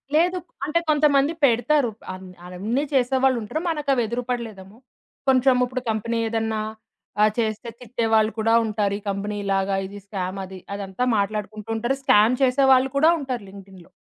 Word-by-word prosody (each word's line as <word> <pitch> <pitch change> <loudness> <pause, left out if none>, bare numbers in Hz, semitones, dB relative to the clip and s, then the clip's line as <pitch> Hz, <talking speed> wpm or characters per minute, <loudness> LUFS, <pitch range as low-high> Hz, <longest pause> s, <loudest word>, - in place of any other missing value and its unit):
లేదు. 355 +3 +3 0.3
అంటే 305 +3 +1
కొంతమంది 295 0 +3
పెడతారు. 245 +1 +2 0.2
అన్ 185 0 -10 0.2
అన్నీ 210 +10 -2
చేసేవాళ్లుంటారు. 260 +1 +1
మనకవి 285 -6 +1
ఎదురుపడలేదు 235 -3 -4
ఏమో. 200 +4 -17 0.5
కొంచెముప్పుడు 255 -1 +3
కంపెనీ 230 +2 -2
ఏదన్నా 225 -1 -1 0.6
ఆహ్, 215 0 +5
చేస్తే 220 0 -2
తిట్టే 235 -1 -3
వాళ్ళు 220 0 +4
కూడా 225 +1 +2
ఉంటారు. 210 -2 -1
ఈ - - -19
కంపెనీ 205 +1 -3
ఇలాగా, 195 0 +1
ఇది 200 +1 -9
స్కామది 190 -1 -5
అదంతా 200 +3 -4
మాట్లాడుకుంటూంటారు. 215 +4 -2
స్కామ్ 215 +1 +5
చేసేవాళ్ళు 265 0 +4
కూడా 315 +3 +5
ఉంటారు 255 -6 -4
లింక్డ్‌ఇన్‌లో. 190 -3 -14
225 Hz, 135 wpm, -23 LUFS, 205-260 Hz, 0.6 s, ఆహ్